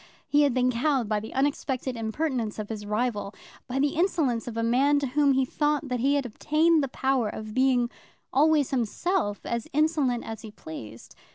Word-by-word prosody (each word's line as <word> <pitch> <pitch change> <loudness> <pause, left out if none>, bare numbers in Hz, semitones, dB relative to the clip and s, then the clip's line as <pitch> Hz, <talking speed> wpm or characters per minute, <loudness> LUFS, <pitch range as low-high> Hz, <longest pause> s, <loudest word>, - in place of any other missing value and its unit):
He 290 0 +4
had 285 -3 +3
been 255 0 +3
cowed 255 -1 +1
by 210 0 0
the 220 - -8
unexpected 265 -2 -1
impertinence 230 0 -2
of 215 -1 -5
his 210 -2 -6
rival, 210 -2 -1 0.3
by 255 - -3
the 285 +2 +3
insolence 305 -9 0
of 230 -1 -5
a 230 - 0
man 265 +5 +3
to 285 - 0
whom 280 +1 +3
he 265 0 +2
thought 295 +1 0
that 250 -1 -1
he 275 +4 +2
had 280 -2 0
obtained 305 +7 +2
the - - 0
power 265 -3 0
of 215 0 -7
being 255 -1 +3 0.5
always 300 0 +3
himself 255 - -1
as 235 -1 -3
insolent 290 -5 +1
as 225 0 -6
he 220 - -9
pleased. 120 - -10
255 Hz, 190 wpm, -27 LUFS, 225-290 Hz, 0.5 s, He